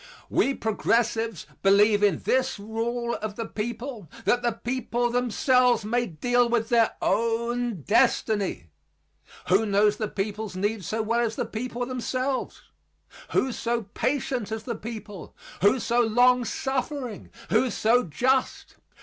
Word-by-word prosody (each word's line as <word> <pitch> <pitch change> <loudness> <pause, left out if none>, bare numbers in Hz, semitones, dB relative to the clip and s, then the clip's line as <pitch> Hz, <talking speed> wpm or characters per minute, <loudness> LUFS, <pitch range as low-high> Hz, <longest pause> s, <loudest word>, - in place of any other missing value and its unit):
We 275 - +2
progressives 225 -2 0 0.2
believe 205 +2 +5
in 200 -6 +2
this 260 -1 +1
rule 230 +3 -3
of 215 -1 -4
the 230 - -4
people 235 - -5 0.2
that 245 - +3
the 240 -1 0
people 240 0 -2
themselves 245 -1 +2
may 240 +2 0
deal 245 +8 +1
with 230 -1 0
their 230 -2 +3
own 235 - 0
destiny. 205 - +1 0.8
Who 190 +4 +4
knows 210 0 +2
the 215 - -2
people's 210 0 -4
needs 205 0 -2
so 220 0 -1
well 230 +2 0
as 230 -2 0
the - - -2
people 240 +2 -4
themselves? 255 +1 -3 0.7
Who 260 - +2
so 235 0 -2
patient 255 -5 -1
as 220 0 -4
the 235 - -3
people? 215 -4 -8 0.3
Who 205 +7 +4
so 240 0 +1
long 245 +2 +4
suffering, 265 -3 -3 0.2
who 260 - +3
so 235 +3 +2
just? 255 - -1
230 Hz, 135 wpm, -26 LUFS, 215-245 Hz, 0.8 s, believe